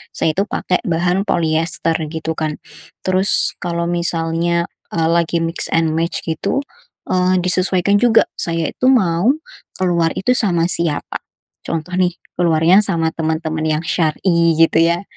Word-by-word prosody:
saya 160 - +1
itu 195 +5 -1
pakai 180 -2 -1
bahan 180 +4 0
poliester, 165 0 0
gitu, 160 +1 -4
kan. 155 -1 -3 0.5
Terus, 185 +1 +3
kalau 170 -1 -2
misalnya, 170 0 0 0.3
e 165 - -1
lagi 170 0 +1
mix 165 +1 -1
and 165 -1 +1
match, 165 +1 -1
gitu, 160 - -1 0.5
eee, 185 0 +2
disesuaikan 185 +2 +1
juga, 225 +1 +4
saya 165 -2 -1
itu 255 - -1
mau 190 -1 +3 0.5
keluar 170 -3 +1
itu 220 +6 0
sama 175 -7 +2
siapa? 165 -3 -1 0.4
Contoh, 165 +2 -4
nih, 180 -1 +1 0.2
keluarnya 170 +3 +4
sama 165 -5 +2
teman-teman 160 0 -2
yang 155 +1 -1
syar'i, 170 +1 +1
gitu, 165 0 +4
ya. 170 +2 +1
170 Hz, 140 wpm, -18 LUFS, 165-180 Hz, 0.5 s, juga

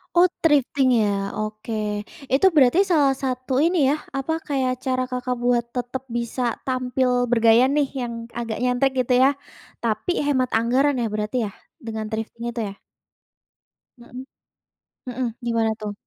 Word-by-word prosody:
Oh, 355 +1 +7 0.2
thrifting 275 -3 +3
ya, 200 -2 0
oke. 215 +1 -5 0.6
Itu 280 +9 +5
berarti 275 +5 +5
salah 280 -4 +4
satu 255 +2 0
ini 345 +2 +2
ya, 290 - +3 0.2
apa, 270 +4 -1
kayak 265 -3 0
cara 255 -1 0
Kakak 250 0 -2
buat 245 -1 +2
tetap 245 +1 -3
bisa 235 +2 -3 0.3
tampil 255 0 0 0.2
bergaya 230 +1 +5
nih 290 -2 +2
yang 235 -1 -3 0.3
agak 230 -2 -3
nyentrik 250 +2 +2
gitu 250 0 +1
ya, 270 - +6 0.5
tapi 225 +8 -1
hemat 260 -3 +1
anggaran 260 +3 +2
ya 230 - 0
berarti 210 +3 -2
ya? 200 - -8 0.3
Dengan 220 -1 -4
thrifting 225 +1 -5
itu 235 - -6
ya? 195 - -10 1.2
Mhm. 245 +2 -10 0.8
Mhm, 250 0 -2 0.2
gimana 230 -2 +1
tuh? 210 -1 -4
250 Hz, 145 wpm, -23 LUFS, 230-265 Hz, 1.2 s, Oh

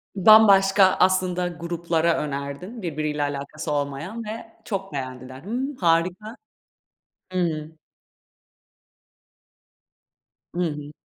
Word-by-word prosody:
Bambaşka 195 -1 +6
aslında 185 -1 +2
gruplara 170 -1 -1
önerdin 145 - -5
birbiriyle 150 -3 -2
alakası 145 +2 -4
olmayan 145 +10 -3
ve 225 +1 -8
çok 195 -5 -4
beğendiler. 130 0 -6
Hımm, 255 +7 -3
harika. 180 +4 0 1.0
Hıı. 160 -4 -1 2.8
Hı - - -2
hı. 150 -2 -4
170 Hz, 80 wpm, -24 LUFS, 150-195 Hz, 2.8 s, Bambaşka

